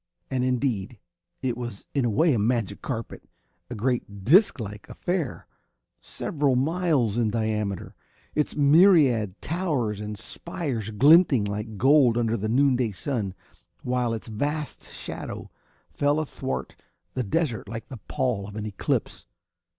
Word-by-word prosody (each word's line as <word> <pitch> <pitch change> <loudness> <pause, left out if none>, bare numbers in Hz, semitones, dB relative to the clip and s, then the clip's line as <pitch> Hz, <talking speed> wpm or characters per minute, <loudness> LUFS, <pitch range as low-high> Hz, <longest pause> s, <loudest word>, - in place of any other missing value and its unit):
And 130 -1 0
indeed, 125 -4 -1 0.5
it 125 -2 0
was 120 -4 -7
in 140 -4 +1
a - - +2
way 155 +8 +3
a 115 - +1
magic 110 -2 0
carpet 115 -4 -5 0.4
a 120 - -5
great 105 -4 -2
disclike 115 - +3
affair, 175 -6 -3 0.5
several 145 -4 -1
miles 140 - +1
in 115 -2 +2
diameter, 105 -3 -2 0.4
its 150 - 0
myriad 145 - +5
towers 145 - -1
and 105 0 -5
spires 125 - -5
glinting 140 - +5
like 105 +1 -4
gold 130 -1 +5
under 115 -1 +1
the 110 -1 -2
noonday 125 -3 +2
sun, 105 -3 -3 0.5
while 125 -1 0
its 115 -1 -5
vast 145 +7 -3
shadow - - -7 0.4
fell 145 +1 +1
athwart 135 -3 -4 0.4
the 130 - -1
desert 120 - -1
like 115 0 -6
the 130 - -7
pall 120 -7 -1
of 105 - -10
an 110 -1 -4
eclipse. 105 -2 -2
120 Hz, 135 wpm, -26 LUFS, 110-145 Hz, 0.5 s, myriad